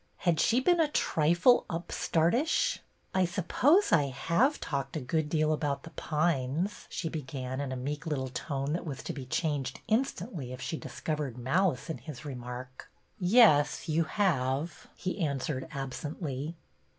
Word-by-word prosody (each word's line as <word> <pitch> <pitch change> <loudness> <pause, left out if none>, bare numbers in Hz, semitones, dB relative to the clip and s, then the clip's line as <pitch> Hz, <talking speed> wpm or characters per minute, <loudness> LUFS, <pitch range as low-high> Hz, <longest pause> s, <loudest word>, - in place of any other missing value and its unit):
Had 170 -3 +1
she 235 +2 +4
been 345 +6 +3
a 320 - +4
trifle 175 - +3
upstartish? 175 - +1 0.3
I 185 - +3
suppose 205 - +3
I 150 -4 +5
have 170 - +1
talked 140 +1 -3
a - - -1
good 150 +3 -1
deal 155 -1 +2
about 145 -3 -1
The 165 - -10
Pines," 155 +3 -1
she 165 - -3
began, 130 -4 -4
in 140 -2 -3
a - - -2
meek 145 +5 -4
little 135 -4 -1
tone 135 +2 -3
that 175 - -2
was 140 -6 -6
to - - -4
be 135 -3 -7
changed 145 -2 -1
instantly 205 - -1
if 130 - -8
she. 160 - -3
discovered 150 -6 -4
malice 155 +5 +1
in 160 - -4
his 155 -2 -9
remark. 125 -1 -7 0.2
'' - - -41
Yes, 180 -8 +5
you 160 +1 +2
have," 155 -5 0
he 185 +2 -4
answered 140 -2 -2
absently. 145 +1 -4
155 Hz, 155 wpm, -30 LUFS, 135-175 Hz, 0.3 s, I